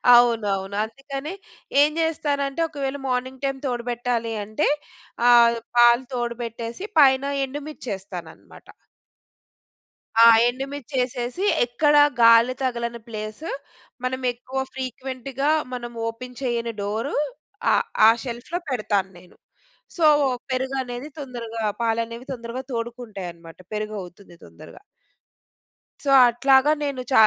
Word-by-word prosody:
అవునవును. 205 -5 +2
అందుకనే 275 +7 -6 0.5
ఏం 295 - +5
చేస్తానంటే 290 -2 -1
ఒకవేళ 280 -2 -3
మార్నింగ్ 255 +1 -2
టైమ్ 270 -1 -1
తోడుబెట్టాలి 240 -1 -2
అంటే 215 +8 -1 0.6
ఆహ్, 235 -1 +6 0.2
పాలు 240 +1 +6
తోడుబెట్టేసి 235 - -4
పైన 265 -1 +6 0.2
ఎండుమిర్చేస్తాననమాట. 210 - -8 1.6
ఆ! - - +10 0.2
ఎండుమిర్చి 270 +2 -6
వేసేసి 250 +7 -2 0.2
ఎక్కడ 290 +5 +2 0.3
గాలి 230 +2 +7
తగలని 235 -2 -2
ప్లేస్, 215 +4 -7 0.6
మనం 260 +1 -2
ఎక్కువ 255 +2 -5
ఫ్రీక్వెంట్‌గా 265 +2 -3 0.2
మనం 240 -1 -5 0.2
ఓపెన్ 250 +2 -7
చేయని 235 -3 -1
డోర్ 220 +6 -2 0.6
ఆహ్, - - +2 0.2
ఆ - - +10
షెల్ఫ్‌లో 250 +8 -4
పెడతాను 210 -6 0
నేను. 180 0 -19 0.6
సో, 330 - +3 0.5
పెరుగు 260 +1 -1
అనేది 245 +3 -7
తొందరగా, 235 -4 -6 0.2
పాలనేవి 230 +1 -1
తొందరగా 235 +1 -6
తోడుకుంటాయి 230 -5 -5
అన్నమాట 165 0 -15
పెరుగవుతుంది 200 -4 -6
తొందరగా. 85 0 -14 1.2
సో, 285 - -1 0.2
అట్లాగా 265 +4 +4
నేను 280 -3 -2
చ - - +1
240 Hz, 105 wpm, -23 LUFS, 230-265 Hz, 1.6 s, ఆ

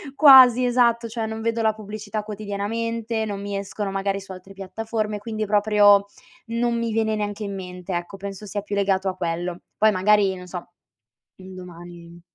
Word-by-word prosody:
quasi, 260 -4 +8
esatto, 235 -1 +2
cioè 225 0 -4
non 220 0 -5
vedo 230 0 -1
la 220 -1 +2
pubblicità 215 0 -6
quotidianamente, 220 +2 -3
non 205 -2 -4
mi 200 0 -5
escono 200 0 -4
magari 195 0 -1
su 195 0 -12
altre 190 +1 -11
piattaforme, 215 +2 -4
quindi 215 0 -4
proprio 205 -1 +4 0.4
non 235 +1 0
mi 230 -1 -2
viene 220 0 0
neanche 210 0 -3
in 200 -1 -4
mente, 180 -1 -7
ecco, 175 +3 -4
penso 200 +1 -8
sia 205 +1 -3
più 205 0 -8
legato 195 -1 +1
a 185 - -5
quello. 175 0 -3 0.2
Poi 215 0 +4
magari, 200 0 +3
non 180 -1 -10
so, 175 -1 -8 0.7
un 185 0 -11
domani 175 -1 -11
205 Hz, 175 wpm, -23 LUFS, 190-220 Hz, 0.7 s, quasi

